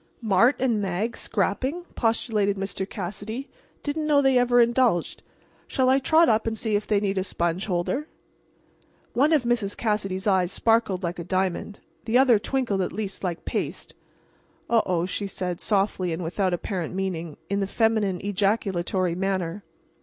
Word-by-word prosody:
"Mart 225 +4 +4
and 235 -5 +1
Mag 200 +4 -2
scrapping?" 260 - -1
postulated 220 -3 0
Mr. 195 0 -4
Cassidy. 210 +7 -6 0.3
"Didn't 305 +1 -2
know 295 -2 +5
they 270 -2 +3
ever 245 0 +4
indulged. 235 -6 +2 0.5
Shall 260 -1 +1
I 265 +1 +5
trot 320 +5 +4
up 220 0 +2
and 225 0 -1
see 220 -1 0
if 205 - -1
they 210 -2 +3
need 195 -1 0
a - - 0
sponge 175 +1 -1
holder?" 200 - -1 1.1
One 285 +6 +3
of 305 -5 +4
Mrs. 235 -4 -1
Cassidy's 200 -4 -1
eyes 190 -3 +2
sparkled 225 -5 +1
like 175 0 -3
a - - -4
diamond. 190 +3 -2 0.2
The 230 +2 +3
other 255 -5 +5
twinkled 235 -4 -1
at 180 - -1
least 200 -1 -5
like 175 -3 -3
paste. - - -4 0.8
"Oh, 230 -1 +5
oh," 175 -2 +1
she 200 +2 -3
said, 180 -2 -4
softly 195 -3 +1
and 165 +2 -3
without 185 +3 0
apparent 180 -1 -4
meaning, 170 -5 -3
in 200 0 -1
the 195 - 0
feminine 215 -4 +1
ejaculatory 195 -3 0
manner. 190 0 -2
200 Hz, 160 wpm, -25 LUFS, 185-235 Hz, 1.1 s, know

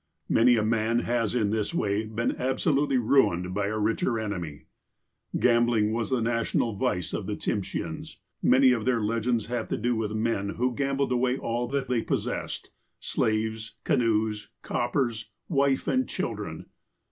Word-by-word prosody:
Many 120 +2 +5
a 110 - +1
man 115 +1 +1
has 120 -2 0
in 105 -4 +1
this 110 -1 -1
way 105 +1 0
been 110 +2 -1
absolutely 135 +1 +1
ruined 100 -8 +2
by 100 0 0
a 110 +1 -2
richer 115 +2 0
enemy. 90 -9 -5 0.7
Gambling 115 -3 +3
was 115 +2 -2
a 130 - +2
national 115 0 0
vice 90 -2 -1
of - - -3
the - - -2
Tsimsheans. - - -4 0.2
Many 130 0 +5
of 115 -3 0
their 125 -2 +2
legends 115 +1 0
have 120 0 -3
to - - -1
do 120 +2 0
with 110 -1 -2
men 110 -3 -1
who 125 +1 +1
gambled 140 0 0
away 125 +1 +1
all 120 0 -2
that 135 +1 -2
they 125 -2 +1
possessed - - -3 0.2
— - - -52
slaves, 110 0 -1
canoes, 110 -2 +1
coppei 120 +1 0
s, 110 -1 -9 0.2
wife 140 -4 +1
and 260 0 +1
children. - - -4
115 Hz, 160 wpm, -27 LUFS, 110-125 Hz, 0.7 s, Many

